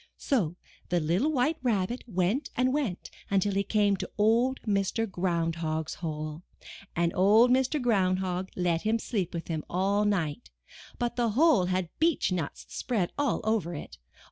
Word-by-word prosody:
So 190 - 0 0.3
the 175 - +2
little 175 - +1
White 300 +3 +1
Rabbit 235 -1 0
went 195 - 0
and 255 +1 +2
went 260 -12 -2 0.2
until 200 0 +1
he 195 - +2
came 205 -1 +2
to - - -5
Old 230 +5 +3
Mr. 200 +1 0
Ground 170 -3 -1
Hog's 160 -1 -2
hole, 155 -1 -5 0.5
and 170 0 +1
Old 215 +6 +5
Mr. 265 +4 +2
Ground 195 -7 +2
Hog 185 0 -3
let 175 -2 0
him 220 +1 +1
sleep 200 -6 -2
with 165 -1 -5
him 160 -2 -3
all 195 +3 +1
night, 160 - -1 0.5
but 240 0 -2
the 240 -1 +2
hole 310 - +5
had 185 -1 -1
beech 325 - +2
nuts 170 -5 -3
spread 210 -9 -2
all 285 -4 0
over 210 -6 0
it. 145 - -9
195 Hz, 165 wpm, -28 LUFS, 175-240 Hz, 0.5 s, Old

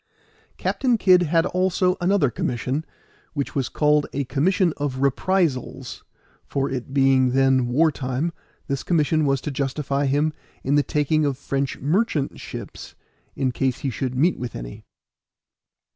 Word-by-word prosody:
Captain 250 -3 +1
Kid 185 -3 +5
had 165 0 +2
also 185 0 +1
another 175 -7 +2
commission, 130 +6 -2 0.5
which 140 -2 -2
was 130 -5 -1
called 150 +2 +2
a 140 - -1
Commission 165 +6 +1
of 145 -3 -2
Reprisals; 145 0 0 0.4
for 135 0 -1
it 130 0 -4
being 135 -2 +3
then 135 -2 +3
war 155 +6 +3
time, 135 +5 -2 0.3
this 140 -1 -2
commission 155 -2 +1
was 135 -1 +2
to 150 - -4
justify 140 +1 -1
him 145 +3 +1 0.3
in 135 - 0
the 145 - +5
taking 150 +2 +1
of 140 -3 0
French 135 -1 -2
merchant 155 - 0
ships, - - -8 0.4
in 130 -2 0
case 130 +1 -1
he 140 -3 -1
should 130 +1 -3
meet 160 +8 +2
with 120 -1 -5
any. - - -7
140 Hz, 145 wpm, -23 LUFS, 130-160 Hz, 0.5 s, Kid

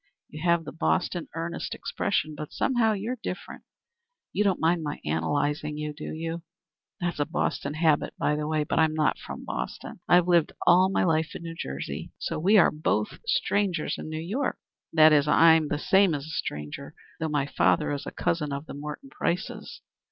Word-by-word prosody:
You 150 - -9
have 170 -1 +2
the - - -6
Boston 175 +1 0
earnest 165 +1 -4
expression, 155 0 -1
but 150 0 -7
somehow 240 -4 +2
you're 220 +5 -3
different. 180 - -6 0.7
You 210 - +2
don't 195 -3 +1
mind 165 +1 +2
my 150 -1 -4
analyzing 145 - -1
you, 150 0 -4
do 150 - -7
you? 165 +1 -4 0.6
That's 175 -3 -2
a 145 - +2
Boston 150 -3 -2
habit 155 -2 +2
by 150 - +1
the 150 0 -2
way. 155 -1 +1
But 150 - -1
I'm 160 -1 +3
not 155 -2 +1
from - - -8
Boston. 60 +1 -5
I've 175 0 +5
lived 170 -3 +3
all 185 +2 +6
my 195 - +1
life 160 -2 +1
in - - -7
New 165 0 -5
Jersey. 70 - -5
So - - -3
we 195 +7 +5
are 190 - +6
both 110 -9 -1
strangers 195 - 0
in - - -6
New 155 - -4
York. 205 - -2 0.3
That 155 -1 +7
is, 145 -1 +4
I'm 160 +1 +6
the 145 - -1
same 190 +2 +4
as 140 -1 -5
a - - -9
stranger, 135 - -5 0.2
though 160 -1 -1
my 145 -2 +1
father 145 - +2
is 140 -1 -4
a - - -4
cousin 150 -4 -1
of 140 +2 -4
the - - -8
Morton 150 - -7
Prices. 180 +5 -3
160 Hz, 190 wpm, -27 LUFS, 150-175 Hz, 0.7 s, That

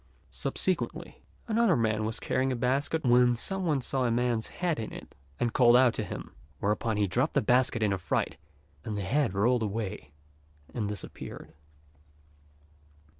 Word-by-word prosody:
Subsequently, - - -2 0.3
another 225 -5 +3
man 110 -3 +1
was 110 +1 -3
carrying 130 +1 0
a - - 0
basket 135 +5 0
when 125 0 +5
some 190 +10 -3
one 145 -4 +1
saw 130 +1 -1
a 120 - +2
man's 120 -1 0
head 175 -5 -2
in 110 - -5
it, - - -10 0.3
and 120 -1 0
called 120 -2 +6
out 125 -2 +5
to 110 - -2
him; - - -7 0.2
whereupon 105 +2 0
he 105 - +2
dropped 95 - 0
the - - +5
basket 125 0 +2
in 100 -2 +2
a 95 - -2
fright, - - -1 0.5
and 105 -2 -4
the 100 - -2
head 120 +1 0
rolled 120 +5 +2
away 105 -6 -3 0.6
and 105 -4 -2
disappeared. 105 -4 -8
120 Hz, 165 wpm, -29 LUFS, 110-130 Hz, 0.6 s, called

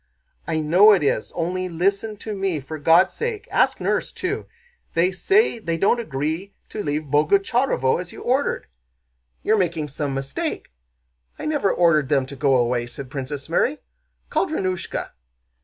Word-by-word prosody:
"I 160 -1 0
know 185 +8 +6
it 190 - +2
is, 125 -6 0
only 180 +2 -2
listen 200 +5 0
to 215 - -3
me 190 -5 -1
for 155 +3 -7
God's 165 +5 +5
sake! 460 -3 -4
Ask - - +2
nurse - - -1
too. 390 +3 -3 0.5
They 175 +3 +3
say 390 - +2
they 165 -6 -2
don't 200 +7 +3
agree 160 +1 -3
to 215 - -4
leave 150 -2 -1
Boguchárovo 175 - +2
as 175 - -9
you - - -10
ordered." 260 +3 0 0.8
"You're 220 0 +3
making 165 -5 -1
some 140 0 -3
mistake. 135 - -4 0.7
I - - -6
never 295 -10 +1
ordered 155 -5 +3
them 140 -3 +2
to 140 +2 -9
go 135 0 +2
away," 120 -1 +1
said 125 +2 -9
Princess 140 0 -5
Mary. 250 - +1 0.5
"Call - - +1
Drónushka." 185 - -3
170 Hz, 155 wpm, -23 LUFS, 145-205 Hz, 0.8 s, know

